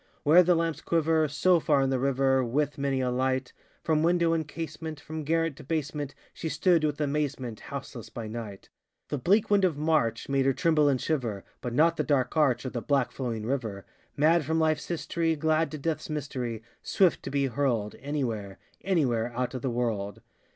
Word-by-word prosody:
Where 160 +4 +7
the 180 0 +4
lamps 165 -2 -1
quiver 160 -1 +2
So 170 +5 +3
far 145 -3 +2
in 135 - 0
the 130 - +1
river, 135 0 +2
With 145 +5 -1
many 135 -1 0
a 125 -1 0
light 130 +1 -1 0.3
From 155 -1 +2
window 170 0 +3
and 160 -2 -1
casement 160 -1 -6
From 155 +1 -6
garret 165 0 0
to - - -10
basement, 145 -1 -3 0.2
She 160 - -4
stood, 170 -1 +3
with 150 -1 0
amazement, 140 -6 -2
Houseless - - -7
by 115 - -6
night. 110 -3 -7 0.4
The 145 - -2
bleak 205 - +2
wind 200 -1 +4
of 175 -6 +2
March 150 -7 +1
Made 135 -1 +1
her 135 - +4
tremble 150 0 +3
and 135 -2 +1
shiver, 120 -11 -2 0.2
But 120 -1 -4
not 165 +3 +4
the - - +1
dark 130 -3 +1
arch, 140 -5 +2
Or 130 - -3
the 120 - -3
black 140 -2 +1
flowing 115 -5 -4
river: 115 -6 -3 0.3
Mad 160 +3 +4
from 160 +3 -1
lifeŌĆÖs 155 -2 +1
history, 165 -1 -1
Glad 160 +1 +1
to 155 - -6
deathŌĆÖs 155 +2 -3
mystery, 125 -7 -4 0.2
Swift 185 -4 +2
to - - -6
be 140 -1 +1
hurlŌĆÖdŌĆö 120 -5 -1
Anywhere, 115 -9 -3 0.3
anywhere 125 -11 +1
Out 125 +1 -1
of 130 - -4
the 130 - -1
world! 110 -5 -2
145 Hz, 195 wpm, -28 LUFS, 125-160 Hz, 0.4 s, Where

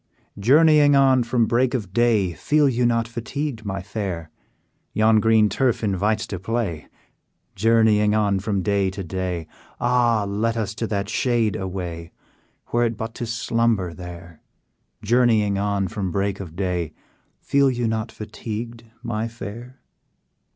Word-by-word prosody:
"Journeying 145 +5 +5
on 135 -2 +5
from 120 0 +1
break 125 +3 +1
of 100 -7 -4
day, 110 -6 +2
Feel 150 - +2
you 125 -2 +2
not 115 -1 +1
fatigued, 115 +2 -4
my 95 -1 -4
fair? 95 -6 -5 0.6
Yon 110 0 +4
green 110 0 +4
turf 120 +3 0
invites 105 +2 0
to 95 -4 -6
play; 95 -6 -3 0.7
Journeying 110 0 +3
on 100 -2 +2
from 100 -1 -2
day 100 -1 +1
to 95 +1 -6
day, 90 -1 -3 0.3
Ah! 120 -3 +2
let 110 +3 -1
us 110 -1 -2
to 115 0 -3
that 100 -2 -2
shade 115 -2 +1
away, 90 -4 -5 0.6
Were 120 0 +2
it 115 -1 -2
but 110 0 -5
to 120 - -5
slumber 115 -6 0
there! 85 -2 -10 0.6
Journeying 110 -3 +3
on 100 -1 0
from 100 -3 -3
break 100 +2 -1
of 85 -5 -8
day, 90 -4 -2 0.5
Feel 140 -1 +2
you 120 -2 -1
not 110 -1 -2
fatigued, 115 +2 -7 0.2
my 115 -1 -2
fair?" 115 +3 -9
110 Hz, 145 wpm, -23 LUFS, 95-120 Hz, 0.7 s, Journeying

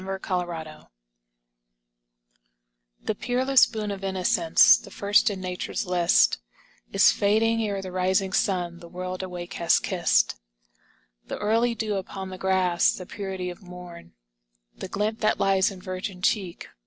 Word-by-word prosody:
[21 190 0 -4 0.3
GOSSAMER 160 -2 -8 2.2
The - - -1
peerless 255 +4 +3
boon 215 -3 -4
of 195 -1 -7
innocence, 190 -2 +4
The - - -12
first 205 +3 +2
in 200 -2 -5
nature's 180 -1 -4
Hst, 170 - +3 0.5
Is 195 - +5
fading, 225 +2 +2
ere 200 -3 -2
the 185 - -7
rising 185 +1 0
sun 175 -4 0
The 170 - -12
world 185 +1 -5
awake 180 0 -7
has 170 - +4
kist. - - +1 0.9
The - - -5
early 230 +3 +1
dew 215 -2 -2
upon 190 0 -6
the 185 - -8
grass, 185 -2 +2
The 180 - -8
purity 190 -2 -5
of 175 - -13
morn, 180 - -12 0.6
The - - -7
glint 210 +4 -2
that 215 0 +1
lies 195 -1 +3
in 195 -2 -10
virgin 185 0 -6
cheek. 190 -6 -1
190 Hz, 140 wpm, -25 LUFS, 180-205 Hz, 2.2 s, Is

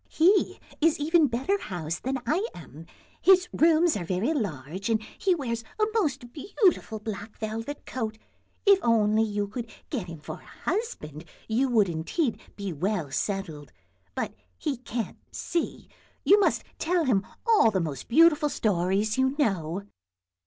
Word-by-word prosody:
He 375 +5 +3 0.2
is 325 +1 +4
even 315 +1 +4
better 270 +12 0
housed 170 -4 -4
than 265 +1 -1
I 345 - +1
am; 160 0 -11 0.3
his 370 -1 +6
rooms 330 +1 +4
are 200 - -2
very 190 - 0
large 185 - -3
and 225 -1 +3 0.2
he 375 -2 +2
wears 235 -7 -3 0.2
a - - +3
most 275 - -1
beautiful 345 - +1
black 210 0 -7
velvet 225 +6 -5
coat; 220 -4 -4 0.5
if 400 -1 +7
only 220 -2 +3
you 205 -2 0
could 230 +3 -6 0.2
get 225 -11 -2
him 165 -2 -8
for - - -8
a - - -7
husband 170 - -4 0.2
you 250 +4 +1
would 220 -5 +4
indeed 180 - -1
be 200 -3 -4
well 175 -2 -1
settled, 165 -4 -3 0.4
but - - -2 0.2
he 290 -5 -2
can't 235 -3 -5
see. 340 - -3 0.4
You 410 - +6
must 405 - +2 0.2
tell 345 0 +1
him 205 -7 +2 0.2
all 450 - +5
the 195 -3 0
most 150 -6 -4
beautiful 300 +2 +5
stories 205 +1 +1
you 265 +1 +2
know." 195 - 0
225 Hz, 150 wpm, -27 LUFS, 195-310 Hz, 0.5 s, if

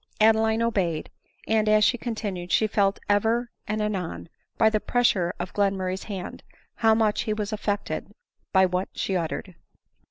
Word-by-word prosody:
Adeline 220 +1 +4
obeyed; 185 -9 -1 0.4
and 215 -1 +2
as 215 0 +5
she 245 - +4
continued, 210 -7 -4
she 220 - +4
felt 200 -2 +1
ever 225 +4 +1 0.2
and 215 0 -1
anon, 190 -5 -3 0.3
by 220 - +5
the 215 -1 +2
pressure 205 -8 +2
of 175 +1 -5
Glenmurray's 190 -2 0
hand, 195 -4 -6 0.4
how 220 -1 +4
much 220 -2 +2
he 215 - -1
was 210 0 -3
affected 205 -4 -3 0.4
by 190 -1 +5
what 180 +1 -1
she 195 - -1
uttered. 175 +2 -3
210 Hz, 155 wpm, -25 LUFS, 190-220 Hz, 0.4 s, as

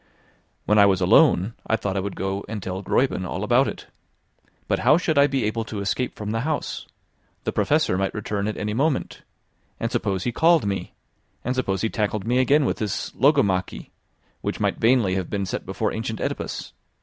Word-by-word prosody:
When 105 0 +4
I 100 - +7
was 95 -2 +2
alone, 95 - +4
I 110 - +2
thought 100 -3 -3
I - - +1
would 100 +1 -4
go 95 +1 -3
and 105 -3 -5
tell 95 +1 -4
Gräuben 125 -2 +1
all 90 - -4
about - - +3
it. - - -6 0.8
But - - +1
how 140 +6 +5
should 165 -3 0
I 140 - +6
be 135 -3 -1
able 115 +2 -1
to 110 -2 -5
escape 100 +6 -2
from 105 0 -5
the 115 - -1
house? 150 +4 -3 0.6
The - - -1
Professor 90 - +1
might 95 0 -1
return 105 -1 -2
at 110 - -3
any 105 0 -2
moment. 140 +4 -1 0.6
And - - -2
suppose 95 -3 -1
he 120 - -1
called 165 +3 +4
me? 100 -1 -3 0.5
And 125 - -1
suppose 95 -8 -1
he 110 - +1
tackled 105 -2 -1
me 125 +2 +2
again 140 +3 +4
with - - 0
this 105 -3 -3
logomachy, 105 - +1 0.5
which - - -3
might - - 0
vainly 115 -5 +3
have 95 -2 -2
been 100 -1 -2
set 95 - -5
before - - -1
ancient - - -4
Oedipus. - - -4
105 Hz, 195 wpm, -24 LUFS, 95-130 Hz, 0.8 s, I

